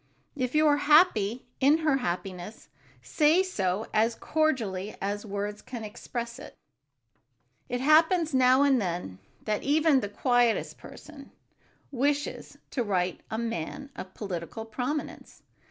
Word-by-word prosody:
If 255 -1 -2
you 310 +1 +4
are 290 -1 +4
happy 290 - +3
in 280 +3 +5
her 290 -3 +3
happiness, 185 -1 -5 0.3
say 305 - +3
so 205 - -1
as 225 +2 +2
cordially 225 -13 -1
as 205 +2 -3
words 205 +1 -4
can 240 -3 -7
express 235 +2 -6
it. - - -11 1.1
It 245 0 -2
happens 320 +2 +4
now 260 +1 +5
and 270 -4 +3
then 170 - -4 0.2
that 210 -1 -1
even 300 0 +3
the 205 - -4
quietest 245 +1 +1
person 290 -3 -12 0.6
wishes 285 +2 -2
to 260 - -1
write 185 -5 -1
to - - -31
a 220 - -3
man 230 - -4
of 185 0 -9
political 195 +2 -5
prominence. 250 +7 -5
240 Hz, 135 wpm, -28 LUFS, 205-290 Hz, 1.1 s, in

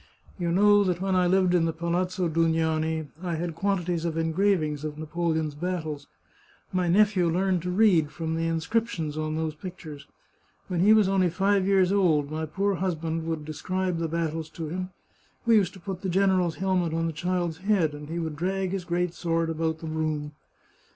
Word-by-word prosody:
You 170 -1 0
know 205 +3 +5
that 180 -3 0
when 190 0 0
I 180 -1 +3
lived 185 0 +3
in 170 -2 +3
the 165 - +1
Palazzo 175 +2 -1
Dugnani 160 -1 +1 0.2
I 175 -2 -2
had 170 +1 -3
quantities 175 -1 -1
of 165 -1 -2
engravings 165 -3 +1
of 150 -1 -5
Napoleon's 160 -1 -1
battles. 155 -3 -4 0.7
My 180 -1 +1
nephew 190 -1 +3
learned 185 +1 +1
to 180 - -4
read 180 -6 +4
from 160 +1 -3
the 165 0 -1
inscriptions 165 -1 -1
on 155 0 -2
those 160 -1 -2
pictures. 155 -3 -9 0.6
When 180 -2 -1
he 200 +5 +5
was 215 -3 +6
only 190 -2 +2
five 195 +2 +1
years 190 -2 +4
old 160 -8 +2
my 160 0 -3
poor 195 +6 0
husband 165 -3 -2
would 160 -2 -3
de 155 - -5
scribe 185 +2 -2
the 165 - -1
battles 160 -1 -2
to 160 -2 -6
him; 185 +2 -4 0.6
we 230 -1 +5
used 195 -3 +1
to 190 - -12
put 185 +1 -6
the 190 - -2
general's 185 -2 +2
helmet 180 -4 0
on 165 0 0
the 165 - -2
child's 175 0 -2
head, 190 -6 +1
and 150 0 -9
he 165 - -3
would 160 -3 -3
drag 190 +3 -1
his 190 -2 -3
great 175 0 -1
sword 165 -1 -1
about 160 0 -2
the 165 - -6
room. 155 -2 -2
170 Hz, 190 wpm, -26 LUFS, 160-185 Hz, 0.7 s, was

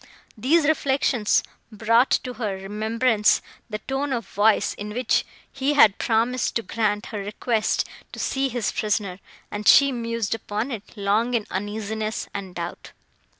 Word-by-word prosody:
These 290 +8 +3
reflections 270 -7 +2 0.3
brought 230 +4 +3
to 250 - -5
her 205 -3 -1
remembrance 215 +3 +1 0.3
the 215 - -3
tone 270 +4 -2
of 235 -1 -3
voice, 210 +2 +2
in 210 +1 -7
which 250 -1 +2 0.3
he 275 +2 0
had 215 -8 +6
promised 235 +2 +1
to 230 - 0
grant 210 -2 -1
her 210 - -2
request 215 +2 -1 0.2
to - - -9
see 270 0 0
his 240 -3 -1
prisoner; 200 -3 -1 0.3
and 205 0 -4
she 280 -1 +7
mused 230 -3 -2
upon 220 +3 -3
it 220 -1 -8
long 215 +5 +1
in 220 -3 0
uneasiness 215 +2 -3
and 190 -3 -6
doubt. 170 0 -6
220 Hz, 150 wpm, -24 LUFS, 210-250 Hz, 0.3 s, she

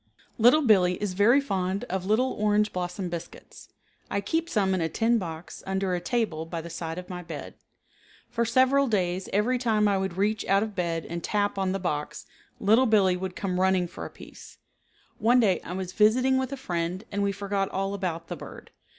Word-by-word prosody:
Little 250 +7 +6
Billee 185 -7 +4
is 205 -3 -2
very 215 +8 +5
fond 195 -6 -2
of 190 -5 -4
little 245 +5 +2
orange 210 0 +1
blossom 180 +1 -3
biscuits. 170 -1 -9 0.4
I 200 - 0
keep 325 +12 -1
some 195 - +1
in 185 - 0
a 160 - 0
tin 230 +4 +2
box 165 -3 -7
under 190 -1 -1
a 180 - 0
table 175 -6 -1
by 165 0 -4
the 170 +1 -8
side 165 0 -5
of 180 - -7
my 180 -1 -6
bed. 165 -4 -8 0.7
For 235 -1 -1
several 260 +4 +3
days 185 -4 -1
every 235 +5 +1
time 220 -4 +2
I 200 -1 +2
would 190 -2 -3
reach 210 +2 +1
out 195 +1 +3
of 220 -1 -5
bed 170 -3 -2
and 170 0 -5
tap 205 -1 0
on 190 -1 0
the 195 - -1
box 150 -6 -3 0.3
Little 225 +6 +4
Billee 200 -4 +4
would 185 0 -5
come 185 -2 -2
running 185 -1 +2
for 175 - -9
a - - -6
piece. - - -14 0.6
One 240 +4 +4
day 200 -6 +3
I 180 - -6
was 185 -1 -4
visiting 250 +6 +4
with 260 0 -3
a 275 - -4
friend 175 -3 -3
and 200 0 -1
we 200 0 +1
forgot 200 0 -2
all 195 +1 -2
about 170 -4 -3
the - - -4
bird. - - -11
195 Hz, 205 wpm, -27 LUFS, 180-220 Hz, 0.7 s, Little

